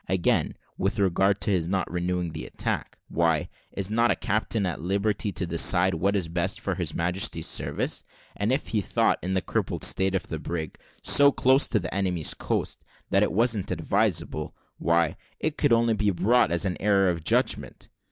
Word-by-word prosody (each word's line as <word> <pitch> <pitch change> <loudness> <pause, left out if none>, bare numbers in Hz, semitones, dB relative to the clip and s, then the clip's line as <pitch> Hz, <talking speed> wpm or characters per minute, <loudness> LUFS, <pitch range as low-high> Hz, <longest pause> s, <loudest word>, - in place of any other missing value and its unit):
Again, 95 -2 +1 0.2
with 100 +4 0
regard 95 0 +2
to 100 - -1
his 85 -4 0
not 95 0 -1
renewing 90 -1 -2
the 80 0 -6
attack, - - -3
why, 80 -3 0 0.2
is 100 +1 -3
not 115 +2 +3
a - - +3
captain 110 0 -1
at 90 -4 -3
liberty 100 +3 -1
to 95 - -1
decide 90 +2 +3
what 95 +5 0
is 100 - +1
the 80 - -8
best 90 +2 -1
for 100 - -2
His 90 -4 -3
Majesty's 90 +3 0
service? - - -2 0.3
And 105 +4 -1
if 135 +3 -1
he 110 - 0
thought, - - +1
in 95 +1 -2
the 95 - 0
crippled - - -2
state 95 0 +3
of 95 - -2
the 80 - -5
brig, 80 -1 -5 0.2
so 140 0 +7
close 130 +1 +3
to 110 - +1
the 90 - -5
enemy's 90 -5 0
coast, - - -3 0.3
that - - +3
it - - +2
wasn't 110 -1 +1
advisable, - - -1 0.2
why, 85 -1 +1 0.2
it 155 -1 -1
could 145 -4 +1
only 115 0 +3
be 105 -1 +1
brought 115 +6 +2
in 85 - 0
as 85 - +1
an 90 -2 -2
error 100 -1 +3
in 85 - -4
judgment. - - 0
95 Hz, 195 wpm, -26 LUFS, 85-105 Hz, 0.3 s, so